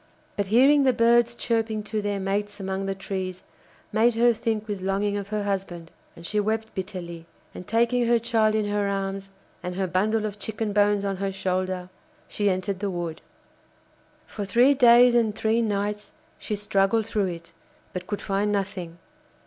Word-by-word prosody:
But 200 -1 -1
hearing 270 +7 +5
the 260 -1 +4
birds 235 0 +3
chirping 225 -3 -1
to 215 0 -3
their 205 -1 -2
mates 205 +2 -2
among 195 0 -3
the 195 - -2
trees 185 -1 -5 0.5
made 225 +2 +3
her 240 +1 +4
think 220 -1 -2
with 205 -3 -4
longing 200 +2 0
of 200 -1 -4
her 210 0 -2
husband, 185 -4 -4 0.2
and 170 - -11
she 210 +4 0
wept 220 +1 -1
bitterly, 175 -3 -6 0.3
and 180 - -9
taking 235 +1 +2
her 235 0 +4
child 220 -1 +1
in 215 -1 +1
her 205 0 0
arms, 195 0 -3 0.3
and 180 0 -5
her 190 0 0
bundle 210 +5 0
of 210 -1 -5
chicken 215 0 -3
bones 205 0 +3
on 195 -1 -2
her 195 0 -2
shoulder, 185 -1 -2 0.4
she 205 -1 0
entered 185 0 -2
the 205 0 -2
wood. 170 -3 -4 1.0
For 210 - -6
three 240 +7 +4
days 245 -2 +6
and 225 -3 +2
three 225 +2 +1
nights 210 -1 -2 0.3
she 210 - -3
struggled 205 +1 +1
through 210 -3 0
it, 170 -1 -7 0.4
but 180 0 -5
could 205 - -4
find 200 +1 0
nothing. 190 -4 -3
205 Hz, 175 wpm, -25 LUFS, 195-220 Hz, 1.0 s, days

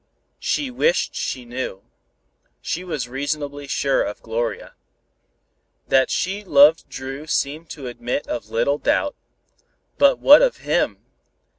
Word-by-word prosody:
She 285 -3 -1
wished 475 - +1
she 125 -2 -4
knew. 120 -5 -5 0.8
She 180 - -4
was 150 -9 -4
reasonably 145 +2 -4
sure 135 0 +1
of 105 - -4
Gloria. 115 +1 -3 1.2
That 130 0 +4
she 195 +3 -2
loved 150 -2 +5
Dru 135 +3 -7
seemed 155 +2 -2
to 140 -4 -8
admit 120 +2 -3
of 115 -3 -5
little 130 +6 0
doubt. 290 - 0 0.8
But 280 -1 +5
what 290 +2 +8
of - - +2
him? - - 0
140 Hz, 125 wpm, -22 LUFS, 125-165 Hz, 1.2 s, what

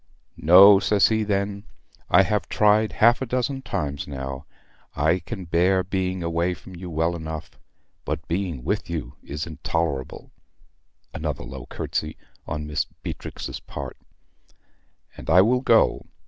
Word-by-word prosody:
"No," 95 +4 +9
says 105 0 +3
he, 110 -1 +1
then: 100 -1 -1 0.5
"I 95 +3 +6
have 105 +2 -1
tried 105 +1 +3
half 120 +3 +4
a - - 0
dozen 130 +2 -1
times 70 - -3
now. 70 0 -6 0.5
I 80 +5 +2
can 95 +2 -7
bear 90 +3 +2
being 95 -1 -2
away 85 +2 0
from 95 - -13
you 90 +1 -8
well 80 +1 0
enough; 80 -1 -6 0.5
but 80 - -4
being 85 -6 -2
with - - -2
you - - -4
is 75 +2 -5
intolerable" 80 -3 -3 0.8
(another - - -4
low 65 +2 -9
curtsy 75 +4 -4 0.3
on 75 +1 -4
Mistress 75 -1 -3
Beatrix's - - -6
part), - - -7 1.2
"and - - -9
I 90 +3 +7
will 125 +4 +2
go. 115 -4 +3
90 Hz, 140 wpm, -24 LUFS, 75-100 Hz, 1.2 s, No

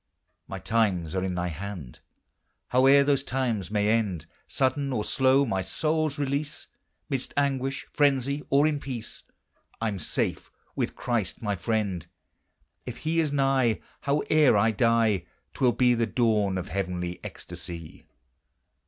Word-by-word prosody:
My - - -5
times 95 -8 0
are 95 -1 -1
in 95 -1 -2
thy 90 0 -1
hand! 85 -6 -7 0.7
Howe'er 135 +2 +6
those 140 -1 +2
times 120 -9 -1
may 105 -1 +1
end, 105 -8 0 0.2
Sudden 135 +1 0
or 110 -5 -1
slow 135 +1 +3
my 95 -6 -1
soul's 155 - -1
release, 145 +1 -2 0.4
Midst 135 -2 -3
anguish, 135 -1 0
frenzy, 140 0 +2
or 140 +2 +4
in 155 -2 +1
peace, 125 -5 -6 0.6
I'm 110 -4 -2
safe 75 - -2 0.3
with - - -2
Christ 115 -3 -2
my 105 -2 0
friend. 95 -3 -2 0.8
If 125 - -7
he 165 +1 +1
is 155 -3 +1
nigh, 135 -5 +2 0.3
Howe'er 150 -3 +4
I 110 +2 +4
die, 110 -4 +2 0.3
'T - - -5
will 125 - +6
be 125 0 +3
the 115 -1 +1
dawn 105 -5 +1
of 90 +1 -5
heavenly 90 -2 -3
ecstasy. 85 -2 -8
115 Hz, 140 wpm, -27 LUFS, 100-140 Hz, 0.8 s, Howe'er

